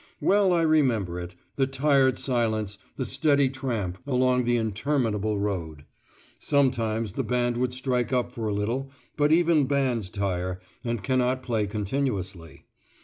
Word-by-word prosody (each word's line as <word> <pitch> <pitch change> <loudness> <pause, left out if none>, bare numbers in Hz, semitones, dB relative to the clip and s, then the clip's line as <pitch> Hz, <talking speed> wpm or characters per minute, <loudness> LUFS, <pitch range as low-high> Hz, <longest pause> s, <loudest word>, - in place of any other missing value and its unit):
Well 200 -1 +3
I 170 -2 +3
remember 120 - +2
it 90 +1 -7 0.2
the 135 -1 +2
tired 135 -1 +3
silence, 110 -5 -1 0.2
the 130 - -3
steady 140 +2 +2
tramp, 115 -9 -3
along 125 -2 +2
the 120 0 +2
interminable 110 -2 0
road. 85 -7 -3 0.5
Sometimes 115 -7 +1
the - - -2
band 120 -1 0
would 125 0 0
strike 125 -1 -1
up 125 -2 0
for 115 -2 -4
a - - -1
little, 120 +7 -2 0.3
but 145 0 +2
even 165 -4 +4
bands 130 -8 0
tire, 95 -3 -2 0.2
and 115 -4 -3
cannot 130 +2 +1
play 110 -4 0
continuously. 100 - -3
120 Hz, 145 wpm, -26 LUFS, 105-135 Hz, 0.5 s, even